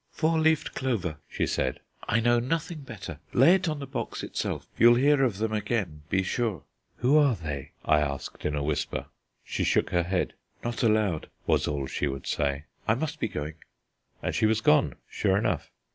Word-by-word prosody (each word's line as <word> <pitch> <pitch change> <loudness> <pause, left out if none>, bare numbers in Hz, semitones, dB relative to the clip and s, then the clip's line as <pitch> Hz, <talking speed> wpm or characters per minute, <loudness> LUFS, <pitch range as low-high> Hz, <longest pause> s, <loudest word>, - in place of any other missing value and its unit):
"Four 160 0 +1
leaved 160 0 +2
clover," 100 - -1
she - - 0
said. 65 - -1 0.3
"I 115 - +2
know 120 +1 +4
nothing 160 +6 -2
better. 100 - -8
Lay 135 +8 +7
it 190 -3 +2
on 155 - -2
the 140 - -5
box - - -4
itself. - - -3
You'll 120 +1 +7
hear 140 +2 +4
of 115 -7 +1
them 110 +1 -1
again, 105 -7 -1
be 95 0 +2
sure." 105 - -1 0.3
"Who 135 +5 +4
are 140 -5 +4
they?" 75 -7 -6
I 75 -1 +5
asked 70 -2 -3
in 75 - 0
a 70 - -1
whisper. 75 0 -2 0.4
She - - -2
shook - - +2
her 90 - +3
head. 90 +2 -1 0.3
"Not 120 0 -2
allowed," 105 -8 +2 0.2
was - - +2
all 70 -2 -1
she 70 - -1
would 70 0 -4
say. 70 0 -1 0.2
"I 110 - +4
must 155 +4 -3
be - - 0
going"; 75 -4 -5 0.7
and - - -1
she 110 - +3
was 110 0 +2
gone, 75 -8 +4
sure 95 -2 +1
enough. 100 - 0
110 Hz, 190 wpm, -28 LUFS, -, 0.7 s, Lay